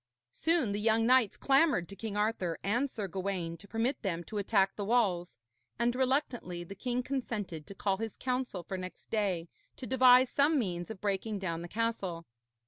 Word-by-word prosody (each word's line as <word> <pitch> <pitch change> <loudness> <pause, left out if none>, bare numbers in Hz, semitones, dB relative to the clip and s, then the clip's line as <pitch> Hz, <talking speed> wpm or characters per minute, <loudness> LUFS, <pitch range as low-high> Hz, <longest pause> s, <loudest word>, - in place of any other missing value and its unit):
Soon 320 -10 +1
the 205 - -1
young 225 +1 +3
knights 250 -3 +4
clamoured 275 - +3
to 200 - -9
King 205 0 -4
Arthur 210 -6 0
and 240 +8 +1
Sir 210 -6 -4
Gawaine 185 -2 -3
to 200 - -14
permit 230 +6 -1
them 175 -5 -2
to 210 +4 -4
attack 195 -1 +2
the 205 - -3
walls, 195 - +1 0.4
and 240 0 +2
reluctantly 255 -9 0
the 175 - -8
king 250 +5 -2
consented 210 - -4
to 200 - -9
call 195 0 0
his 225 0 -5
council 250 -8 -2
for 190 0 -5
next 185 0 -9
day 190 -6 0 0.3
to 255 - -7
devise 255 0 +6
some 295 +2 +3
means 175 -7 -2
of 220 -4 -8
breaking 205 +1 -1
down 170 -4 -3
the 175 - -6
castle. 195 -5 -2
210 Hz, 185 wpm, -31 LUFS, 185-245 Hz, 0.4 s, devise